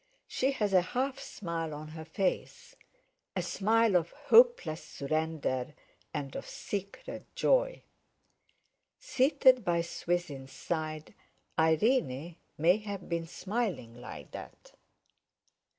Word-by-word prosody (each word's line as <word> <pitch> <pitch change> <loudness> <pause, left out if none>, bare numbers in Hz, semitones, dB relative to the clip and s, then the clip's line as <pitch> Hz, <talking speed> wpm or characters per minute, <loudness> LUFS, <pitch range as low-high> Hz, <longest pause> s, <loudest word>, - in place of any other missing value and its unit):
She 265 - +1
has 210 -6 0
a 185 - +7
half 260 +8 -2
smile 165 -4 -4
on 155 +1 -8
her 160 0 -8
face—a 195 - -4
smile 220 0 +3
of 170 -1 +3
hopeless 445 - +4
surrender 150 -2 -2 0.4
and 140 -2 -4
of - - -5
secret 200 -1 -6
joy. - - +2 1.1
Seated 265 - +4
by 170 -2 +2
Swithin's 170 -6 -3
side, 155 -2 -4 0.5
Irene 160 - +2 0.2
may 170 +6 +5
have 205 -3 -6
been 170 -1 -1
smiling 190 - -3
like 100 - -9
that. - - -10
175 Hz, 105 wpm, -31 LUFS, 155-230 Hz, 1.1 s, a